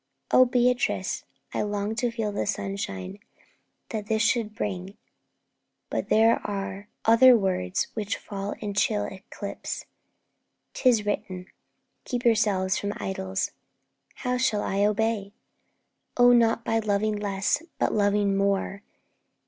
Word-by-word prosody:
"' 135 - -23
'O 255 - +8
Beatrice, 250 +1 +1 0.3
I - - 0
long 205 0 -2
to 245 - +1
feel 225 -3 -2
the 205 - -2
sunshine 195 - -4 0.7
That 215 -2 -4
this 220 0 +1
should 220 -1 +1
bring; 195 -2 -4 0.9
but - - -2
there 225 +1 +5
are 195 0 -4 0.2
other 235 +2 +7
words 185 - 0
Which 215 -2 -2
fall 200 0 -5
in 205 -2 -3
chill 105 - +1
eclipse. 195 - -6 0.9
'Tis 235 -5 +3
written, 185 -3 -3 0.6
"Keep 245 -1 -3
Yourselves 205 -5 +2
from 205 0 -2
idols." 190 0 -3 0.6
How 250 -1 -1
shall 245 -5 +1
I 200 +1 0
obey?' 210 -1 0 0.8
'Oh, 245 0 +7
not 230 -1 +3
by 225 0 +1
loving 215 0 0
less, 200 +4 0 0.2
but - - +1
loving 205 -1 +2
more. 195 0 0
205 Hz, 125 wpm, -26 LUFS, 195-225 Hz, 0.9 s, O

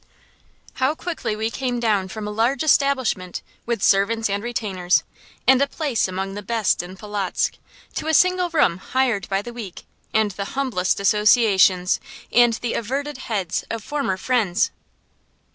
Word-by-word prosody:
How 270 +4 +2
quickly 320 -11 -3
we 220 +1 -2
came 250 -2 -2
down 210 -5 +1
from 215 +1 -6
a - - -3
large 235 +6 +1
establishment, 265 - +1 0.2
with 235 -4 -1
servants 210 +2 +3
and 200 +1 -1
retainers, 200 -6 0 0.4
and 265 0 +5
a 280 - +3
place 280 -8 -1
among 190 +1 -4
the 205 - -5
best 220 +1 +1
in 180 +2 -10
Polotzk, 205 -2 -2 0.4
to - - -3
a 320 - +1
single 365 +1 +3
room 300 - +2
hired 240 -2 0
by 195 0 0
the 240 - -8
week, 215 -7 -8 0.3
and 215 -1 +2
the 200 +1 -5
humblest 225 -11 0
associations, 200 -3 +4 0.3
and 240 0 +5
the 230 +1 -3
averted 275 +4 -3
heads 200 -9 -2
of 230 -2 -4
former 280 -10 -2
friends! 220 -4 +1
220 Hz, 155 wpm, -22 LUFS, 195-260 Hz, 0.4 s, and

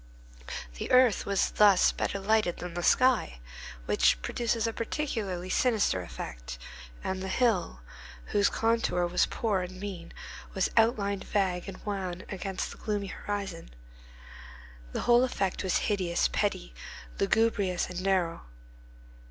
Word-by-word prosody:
The - - -4
earth 250 -4 +5
was 200 -1 +1
thus 205 -3 +5
better 200 - -2
lighted 205 -3 +2
than 180 -1 -6
the 175 - -3
sky, 245 - +3 0.5
which - - +3
produces 230 -1 0
a 225 - -1
particularly 215 -9 -3
sinister 220 - +2
effect, - - -7 0.5
and 190 0 -2
the 190 - -4
hill, 190 - +1 0.5
whose 205 0 +4
contour 225 -6 +1
was 175 +1 +2
poor 210 -5 0
and 185 +1 -7
mean, 190 -4 -6 0.4
was 190 - +1
outlined 210 -4 +2
vague 185 -3 0
and 190 - -10
wan 185 -3 -3
against 190 0 -4
the - - -11
gloomy 205 -2 -3
horizon. 195 -5 -5 1.2
The - - -3
whole 240 +1 +5
effect 195 -7 -1
was 190 - +2
hideous, 185 -5 +1
petty, 130 - -1 0.5
lugubrious, 200 -3 +2
and 180 0 -5
narrow. 185 - 0
195 Hz, 130 wpm, -29 LUFS, 180-220 Hz, 1.2 s, earth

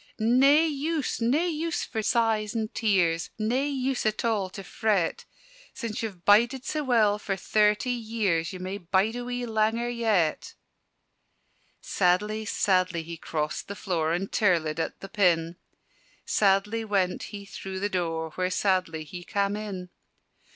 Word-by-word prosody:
"Nae 270 +8 +5
use, 305 -2 -2
nae 270 +9 +2
use 330 0 -2
for 220 - -3
sighs 220 -1 +1
and 220 -1 -2
tears: 180 -7 +1
Nae 235 +5 0
use 270 -2 -1
at 215 +2 -1
all 210 -5 0
to 195 - -8
fret: 195 -3 0 0.5
Sin' 230 -4 -4
ye've 200 -6 -6
bided 240 +6 +4
sae 305 - -1
well 220 -6 +3
for 200 -2 -2
thirty 210 +5 +2
years, 215 -8 -1
Ye 185 - -6
may 185 +2 -5
bide 190 +5 +1
a 245 - -4
wee 245 0 -3
langer 225 +2 0
yet!" 210 -9 0 1.3
Sadly, 210 +4 +1
sadly 185 -5 +1
he 170 +1 -7
crossed 155 -2 -3
the 200 - -6
floor 165 -5 -1
And 190 +3 -2
tirlëd 165 -6 +1
at - - -3
the 195 - -7
pin: 175 -4 +1 0.7
Sadly 205 +3 +2
went 195 -4 0
he 200 -1 -8
through 190 -1 -6
the 205 - 0
door 165 -4 -2
Where 185 +3 -1
sadly 185 -4 0
he 175 +3 -9
cam' 200 +1 0
in. 195 -4 -6
205 Hz, 150 wpm, -27 LUFS, 180-230 Hz, 1.3 s, Nae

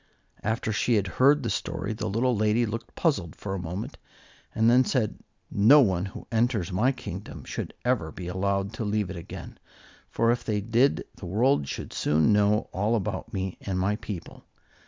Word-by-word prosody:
After 110 0 -1
she 115 +3 +2
had 100 -3 +2
heard 135 +8 +3
the 115 - -1
story, - - -3
the 110 0 -3
little 120 +4 +1
lady 110 +3 +2
looked 115 +1 -6
puzzled 140 - 0
for 95 - -5
a 95 - -2
moment 90 +4 -5 0.6
and 110 +1 +3
then 125 +2 +6
said, 125 -5 -1 0.3
"No 115 +9 +7
one 95 -6 +1
who 95 - -8
enters 115 -5 +1
my 110 +9 +3
kingdom 130 - -7
should - - -5
ever 115 -11 +1
be 90 +3 -7
allowed 100 +2 -1
to 115 - -4
leave 105 -2 -1
it - - -6
again, 85 - -9 0.5
for 115 0 +2
if 120 - -1
they 105 -2 0
did 115 +6 +2
the 95 - -8
world 105 - +2
should - - -6
soon 80 +7 +3
know 105 +1 +3
all 105 +5 +1
about 115 +2 -3
me 95 -3 -3
and 95 -2 -3
my 100 +3 +1
people. 105 -5 -8
105 Hz, 185 wpm, -27 LUFS, 95-115 Hz, 0.6 s, No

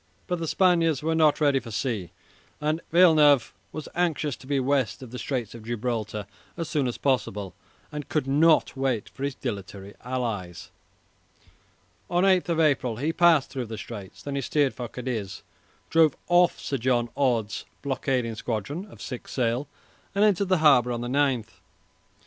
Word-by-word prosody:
But 180 -1 -2
the 165 - -3
Spaniards 165 -5 +2
were 160 +1 +1
not 155 -2 +4
ready 145 -3 +3
for 120 - -10
sea, 110 -4 -2 0.5
and 155 +2 -1
Villeneuve 155 -7 +5 0.2
was 155 - -6
anxious 160 -5 0
to 130 - -15
be 140 -1 +1
west 130 -5 0
of 120 - -10
the 125 - -6
Straits 125 -6 -3
of 115 - -10
Gibraltar 110 -2 -3 0.3
as 165 -2 -3
soon 150 -4 0
as 120 - -3
possible, 105 - -1 0.4
and 150 -1 -6
could 155 -4 0
not 155 +4 +3
wait 130 -5 -1
for 135 - -9
his 140 -1 -2
dilatory 100 -4 -6
allies. 115 -9 -4 1.4
On 175 +2 +2
8 185 -2 +3
April 145 -8 +2
he 150 +8 -1
passed 165 -5 +4
through 130 -4 -4
the 110 0 -6
Straits. 100 -5 -9
Then 140 - -4
he 140 - -1
steered 140 +1 +1
for 125 - -5
Cadiz, 115 -5 -5 0.5
drove 160 -3 +4
off 175 0 +4
Sir 140 - -3
John 120 -1 +1
Orde's 120 -6 0 0.2
blockading 130 -3 -1
squadron 115 - -4
of - - -12
six 125 - -7
sail, 125 +2 0 0.5
and 200 - +3
entered 200 -2 +2
the 185 - +4
harbour 125 -4 +6
on 120 -1 -3
the 120 - -4
9th. 125 -7 0
135 Hz, 165 wpm, -26 LUFS, 115-155 Hz, 1.4 s, harbour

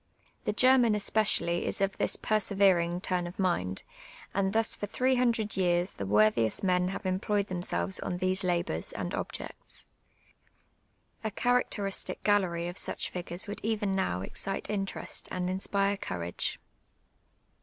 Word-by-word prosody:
The - - +2
German 250 0 +5
espe 210 +1 +2
cially 175 -4 +2
is - - -2
of 195 -1 +1
this - - +2
persevering 190 -5 +2
tm 185 -1 0
n 175 - -3
of 175 - -9
mind, 170 - 0 0.5
and 195 0 +1
thus 225 +1 +2
for 205 - -4
three 255 +5 +1
hundred 235 -4 +1
years 175 0 +1
the 100 - -5
worthiest 110 - +3
men 180 -1 +2
have 195 +2 -5
employed 200 +2 0
themselves 185 +1 0
oil 180 - -2
these 185 +2 +1
labours 175 -1 -1
and - - -4
objects. - - -5 1.4
A 220 - 0
characteristic 215 -3 0
gallery 180 -5 +2
of 175 +1 -5
such - - -2
figures 175 0 -3
would 205 +1 -6
even 210 -3 0
now 90 - 0
excite 195 - -3
interest 195 -2 -3
and 180 0 -2
inspire 200 +1 +1
courage. 85 - -2
190 Hz, 145 wpm, -30 LUFS, 175-205 Hz, 1.4 s, German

